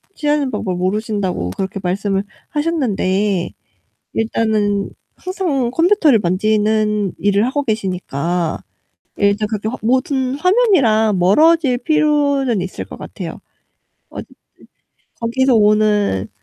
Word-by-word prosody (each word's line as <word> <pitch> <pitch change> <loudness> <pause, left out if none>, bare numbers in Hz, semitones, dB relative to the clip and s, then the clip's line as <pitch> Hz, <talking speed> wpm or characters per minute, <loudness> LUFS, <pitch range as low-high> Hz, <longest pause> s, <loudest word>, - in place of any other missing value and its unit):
취하는 295 -3 0
방법을 185 -4 -3
모르신다고 190 - -2
그렇게 195 - -4
말씀을 195 +2 -1 0.3
하셨는데 210 - -1 0.6
일단은 215 -3 0 0.3
항상 325 -10 -2
컴퓨터를 330 - +3
만지는 210 +1 +1
일을 205 +2 +2
하고 285 +2 -1
계시니까 180 - -2 0.6
일단 205 +1 +1
그렇게 215 0 -3
화 255 - -5
모든 260 +2 0
화면이랑 280 - +3
멀어질 270 - +4
필요는 285 -5 +1
있을 185 +1 -5
것 - - -11
같아요. - - -8 0.7
어 - - -7
즈 - - -12 1.0
거기서 255 +2 +1
오는 210 - +2
215 Hz, 265 characters per minute, -18 LUFS, 200-275 Hz, 1.0 s, 멀어질